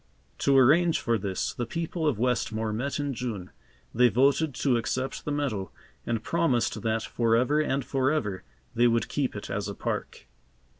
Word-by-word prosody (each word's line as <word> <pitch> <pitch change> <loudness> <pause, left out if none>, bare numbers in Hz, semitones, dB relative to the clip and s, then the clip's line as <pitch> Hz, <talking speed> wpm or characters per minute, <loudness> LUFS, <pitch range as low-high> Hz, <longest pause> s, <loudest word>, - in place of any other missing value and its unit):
To 140 -1 +3
arrange 155 +6 +5
for 115 -2 0
this, 95 -1 -2
the 120 - -4
people 165 +2 -2
of 140 -8 +1
Westmore 110 -2 0
met 140 +7 -2
in 145 -1 -1
June. 110 -7 -5 0.4
They 125 +1 +5
voted 140 +4 +2
to 135 -4 +2
accept 130 +3 -2
the 150 - -2
meadow, 125 - -2 0.4
and 115 -1 -1
promised 165 -7 0
that 110 -1 0
forever 115 +7 +2
and 140 -3 0
forever, 130 -7 0 0.3
they 120 +1 +4
would 115 0 +1
keep 135 -6 -2
it 105 - -6
as 100 +1 -2
a 100 - -5
park. - - -4
125 Hz, 165 wpm, -27 LUFS, 110-140 Hz, 0.4 s, arrange